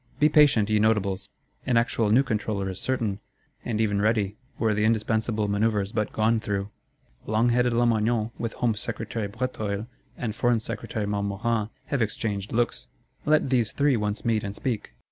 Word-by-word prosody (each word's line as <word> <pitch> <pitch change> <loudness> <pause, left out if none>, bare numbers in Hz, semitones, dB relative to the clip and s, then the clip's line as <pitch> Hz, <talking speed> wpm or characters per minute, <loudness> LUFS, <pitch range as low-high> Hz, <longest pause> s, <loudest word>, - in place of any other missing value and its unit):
Be 150 +2 +5
patient, 145 -9 +5
ye 105 - +4
Notables! 100 -2 +1 0.3
An 125 -3 +2
actual 115 -2 +1
new 120 +6 +5
Controller 105 -5 -2
is 95 - -6
certain, 115 -6 -1 0.4
and 110 -3 -2
even 105 -2 +1
ready; 105 -2 +1 0.2
were 110 -2 +2
the 105 +1 0
indispensable 110 -1 +1
manœuvres 100 0 0
but 105 -2 -1
gone 110 +1 +2
through. 100 -1 -3 0.6
Long 110 +3 +2
headed 125 +1 +3
Lamoignon, 115 -1 +2
with 115 -1 -3
Home 120 -2 +1
Secretary 110 0 -3
Bréteuil, 110 -2 -3 0.3
and 115 -3 -3
Foreign 120 0 +2
Secretary 110 -1 -4
Montmorin 105 +2 -1 0.2
have 140 -4 -1
exchanged 105 -2 -2
looks; 120 +1 0 0.4
let 150 -3 +3
these 120 -4 +2
three 140 -2 +3
once 105 0 -2
meet 110 -2 +1
and 100 0 -5
speak. 110 - -3
110 Hz, 165 wpm, -26 LUFS, 105-120 Hz, 0.6 s, Be